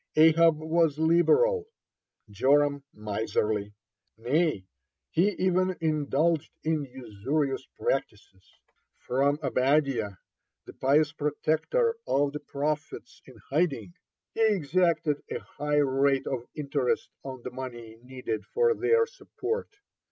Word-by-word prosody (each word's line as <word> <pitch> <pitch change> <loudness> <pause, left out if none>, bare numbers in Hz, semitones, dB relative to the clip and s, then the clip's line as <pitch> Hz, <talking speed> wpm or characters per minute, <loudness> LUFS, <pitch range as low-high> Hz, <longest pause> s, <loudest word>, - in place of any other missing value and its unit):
Ahab 160 0 +6
was 160 -1 +1
liberal, 430 - +3 0.6
Joram 140 +6 +2
miserly, 105 -1 -2 0.4
nay, 130 - 0 0.5
he 180 +5 +3
even 185 0 +1
indulged 155 0 +1
in 155 -2 0
usurious 130 +3 -3
practices. 100 -7 -4 0.4
From 140 +3 +1
Obadiah, 135 -5 +1 0.5
the - - -11
pious 145 +3 +2
protector 160 - 0
of 140 0 +1
the 150 - -4
prophets 150 +1 -4
in - - -14
hiding, 150 -2 0 0.4
he 225 - -2
exacted 170 -6 +2
a - - -2
high 150 +1 -3
rate 135 -1 +2
of 125 -2 -4
interest 140 -4 -1
on 130 -3 -8
the 125 - -5
money 120 -3 -8
needed 125 -3 -5
for 470 +2 +2
their 455 +3 +3
support. 455 -2 -5
145 Hz, 105 wpm, -28 LUFS, 130-165 Hz, 0.6 s, Ahab